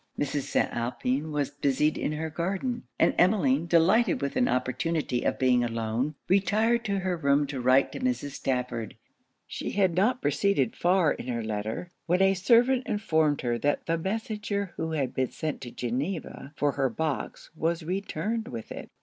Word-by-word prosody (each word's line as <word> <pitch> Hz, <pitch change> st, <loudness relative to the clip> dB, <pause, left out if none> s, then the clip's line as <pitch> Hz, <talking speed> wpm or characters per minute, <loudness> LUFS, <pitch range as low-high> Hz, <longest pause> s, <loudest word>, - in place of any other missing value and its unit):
Mrs. 145 Hz, -1 st, -2 dB
St. -, -, +2 dB
Alpin 125 Hz, +5 st, -2 dB
was 145 Hz, -2 st, -1 dB
busied 145 Hz, +1 st, +1 dB
in 150 Hz, -, -2 dB
her 160 Hz, +1 st, -3 dB
garden; 195 Hz, -, -2 dB
and -, -, +3 dB
Emmeline, 170 Hz, -6 st, +3 dB
delighted 185 Hz, +8 st, +4 dB
with 140 Hz, -1 st, -3 dB
an 250 Hz, -, +3 dB
opportunity 130 Hz, +2 st, -1 dB
of -, -, 0 dB
being 125 Hz, -2 st, +3 dB
alone, 115 Hz, +5 st, -2 dB
retired 215 Hz, +5 st, +2 dB
to 200 Hz, -2 st, 0 dB
her 185 Hz, -1 st, 0 dB
room 145 Hz, -2 st, +2 dB
to 135 Hz, -2 st, -5 dB
write 130 Hz, +2 st, +4 dB
to -, -, -6 dB
Mrs. 250 Hz, -, -1 dB
Stafford. 125 Hz, -5 st, -3 dB, 0.5 s
She -, -, -5 dB
had 190 Hz, -3 st, +2 dB
not 220 Hz, +9 st, +2 dB
proceeded 145 Hz, -, +1 dB
far 175 Hz, -3 st, +3 dB
in -, -, -5 dB
her 120 Hz, -2 st, -2 dB
letter, 110 Hz, +10 st, -4 dB, 0.2 s
when 180 Hz, +2 st, +2 dB
a 195 Hz, 0 st, +5 dB
servant 240 Hz, +7 st, +3 dB
informed 160 Hz, -8 st, +1 dB
her 120 Hz, -2 st, -1 dB
that 145 Hz, +4 st, 0 dB
the 165 Hz, -, +1 dB
messenger 205 Hz, 0 st, -3 dB
who 160 Hz, 0 st, -3 dB
had 135 Hz, -5 st, -1 dB
been 130 Hz, -1 st, 0 dB
sent 155 Hz, -2 st, -4 dB
to 125 Hz, -, -6 dB
Geneva 140 Hz, +5 st, -4 dB
for 145 Hz, -1 st, +2 dB
her 135 Hz, -1 st, 0 dB
box 155 Hz, +4 st, -4 dB
was 165 Hz, +1 st, -1 dB
returned 200 Hz, +5 st, -2 dB
with 115 Hz, -, -7 dB
it. -, -, -7 dB
155 Hz, 175 wpm, -27 LUFS, 130-195 Hz, 0.5 s, a